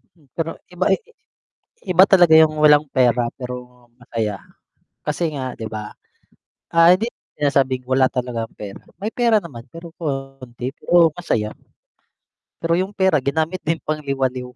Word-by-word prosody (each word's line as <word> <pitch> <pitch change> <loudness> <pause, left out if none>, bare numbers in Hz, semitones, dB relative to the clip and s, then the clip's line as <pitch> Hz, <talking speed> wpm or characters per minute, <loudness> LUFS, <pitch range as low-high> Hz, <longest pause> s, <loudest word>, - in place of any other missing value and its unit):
Hmm, 150 -5 -27
pero 165 0 -2 0.2
iba 180 +2 -1
i 195 - +4
i 470 - -25 0.8
iba 185 - +9
talaga 175 -5 +5
yung 160 -1 +6
walang 150 0 +6
pera 125 -2 +3
pero 125 -1 -8
masaya, 115 -4 -3 0.7
kasi 155 +2 -1
nga 130 -2 -4
'di 110 - -6
ba, 105 -1 -7 0.8
ah, 165 0 +5
hindi 220 +6 +1
ko - - -68 0.2
sinasabing 135 -3 +1
wala 130 0 +4
talagang 120 -3 -3
pera, 100 -2 -9 0.2
may 215 +2 -2
pera 230 -3 +2
naman 120 -9 -10
pero 165 0 -10
konti 135 -4 -5
pero 170 -2 +4
masaya. 110 -11 -1 1.1
Pero 165 0 0
yung 190 +2 -4
pera 190 -7 +2
ginamit 160 +6 -1
din 165 +1 -1
pang 155 0 -2
liwaliw. 130 -3 -2
140 Hz, 155 wpm, -21 LUFS, 125-165 Hz, 1.1 s, iba